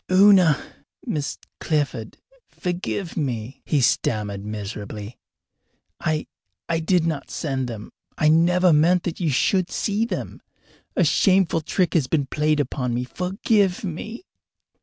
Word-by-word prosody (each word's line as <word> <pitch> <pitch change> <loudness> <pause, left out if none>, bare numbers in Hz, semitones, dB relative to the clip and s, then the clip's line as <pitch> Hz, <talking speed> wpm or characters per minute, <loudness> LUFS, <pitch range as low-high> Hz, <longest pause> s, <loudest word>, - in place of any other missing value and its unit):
"Una 185 -5 +6 0.5
Miss 150 -1 -2 0.2
Clifford 140 -8 -2 0.3
forgive 180 0 -4
me!" 130 -5 -3
he 145 - +2
stammered 105 -4 0
miserably. 105 +1 -6 0.8
"I 155 -1 -1 0.4
I 165 -1 0
did 165 +1 +2
not 155 -4 -2
send 135 -5 -2
them. 110 -3 -7 0.3
I 155 - +3
never 175 +3 +4
meant 170 +4 +4
that 170 - -4
you 170 -4 0
should 180 +7 +2
see 210 +2 0
them. - - -5 0.5
A - - +3
shameful 190 -4 +3
trick 180 +3 0
has 150 -7 +2
been 145 0 +1
played 150 +2 +1
upon 125 -3 -1
me. 125 - -1
Forgive 190 - 0
me!" 210 - -6
155 Hz, 130 wpm, -23 LUFS, 125-180 Hz, 0.8 s, Una